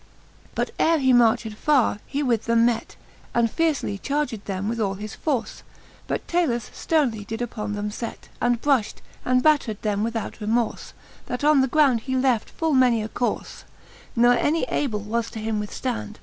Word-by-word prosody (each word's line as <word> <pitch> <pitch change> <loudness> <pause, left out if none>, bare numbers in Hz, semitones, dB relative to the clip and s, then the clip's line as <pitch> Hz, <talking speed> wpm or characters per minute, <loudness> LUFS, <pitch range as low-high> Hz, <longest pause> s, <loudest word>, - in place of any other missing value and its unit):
VIL - - -29
But - - -1
ere 330 0 +4
he 260 -3 +3
marched 225 -2 +3
farre, 250 -2 +2
he 285 +2 -2
with 235 -5 +1
them 230 0 +4
met, 240 -1 -1 0.4
And 235 -2 +3
fiercely 310 -11 0
charged 275 -6 -2
them 195 0 -3
with 230 +1 -2
all 195 -3 0
his 210 +2 -7
force; 275 -7 -2 0.5
But - - -3
Talus 260 -11 0
flernely 225 -8 -1
upon 215 -3 -4
them 205 0 -3
did - - -8
fet, 230 - -6
And 240 -1 +2
brufht 265 -5 0 0.2
and 255 0 +2
battred 280 -9 +2
them 205 -2 0
without 230 0 -3
remorfe, 225 +2 -1 0.3
That 250 - -4
on 300 -2 +5
the 265 - +2
ground 275 -3 +4
he 260 +3 -3
left 255 -4 +1
full 320 -2 -1
many 250 -4 +4
a 215 - -5
corfe 245 +1 -3 0.5
j 235 - +1
Ne 245 0 +5
any 320 +3 +1
able 220 -8 -1
was 225 +3 -2
him 220 -1 -2
to 210 - -4
withftand. 230 -2 -4
235 Hz, 185 wpm, -24 LUFS, 220-270 Hz, 0.5 s, on